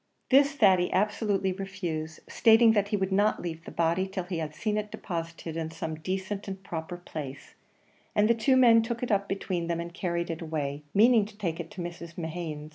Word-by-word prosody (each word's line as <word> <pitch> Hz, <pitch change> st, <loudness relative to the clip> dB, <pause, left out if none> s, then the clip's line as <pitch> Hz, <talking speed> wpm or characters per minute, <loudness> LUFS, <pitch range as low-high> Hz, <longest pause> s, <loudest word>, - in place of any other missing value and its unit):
This 280 Hz, +2 st, +6 dB
Thady 190 Hz, -9 st, +4 dB
absolutely 205 Hz, -1 st, +1 dB
refused, 175 Hz, -5 st, -5 dB
stating 225 Hz, 0 st, +6 dB
that 205 Hz, -2 st, +2 dB
he 210 Hz, 0 st, 0 dB
would 190 Hz, -1 st, -1 dB
not 205 Hz, +2 st, +3 dB
leave 165 Hz, -1 st, -6 dB
the -, -, -7 dB
body 170 Hz, +3 st, +1 dB
till 190 Hz, -1 st, -4 dB
he 175 Hz, -1 st, -4 dB
had 155 Hz, -1 st, -4 dB
seen 215 Hz, -2 st, -1 dB
it 210 Hz, 0 st, -2 dB
deposited 165 Hz, -4 st, -5 dB
in 160 Hz, -1 st, -3 dB
some 160 Hz, 0 st, -5 dB
decent 190 Hz, +6 st, -4 dB
and 190 Hz, 0 st, -6 dB
proper 170 Hz, 0 st, -5 dB
place; 150 Hz, -6 st, -8 dB, 0.6 s
and 210 Hz, 0 st, +4 dB
the 235 Hz, -, +5 dB
two 245 Hz, +4 st, +3 dB
men 235 Hz, -3 st, +7 dB
took 235 Hz, +1 st, -3 dB
it 245 Hz, -, -1 dB
up 200 Hz, -1 st, +1 dB
between 185 Hz, -3 st, -2 dB
them 170 Hz, -1 st, -1 dB
and 170 Hz, 0 st, -6 dB
carried 170 Hz, -2 st, -2 dB
it 165 Hz, -, -5 dB
away, 150 Hz, -3 st, -3 dB
meaning 225 Hz, 0 st, +6 dB
to 210 Hz, 0 st, -13 dB
take 170 Hz, -5 st, -3 dB
it 165 Hz, -1 st, -5 dB
to 185 Hz, -, -7 dB
Mrs. 170 Hz, -1 st, -7 dB
Mehan's. 160 Hz, -3 st, -5 dB
185 Hz, 205 wpm, -28 LUFS, 165-210 Hz, 0.6 s, men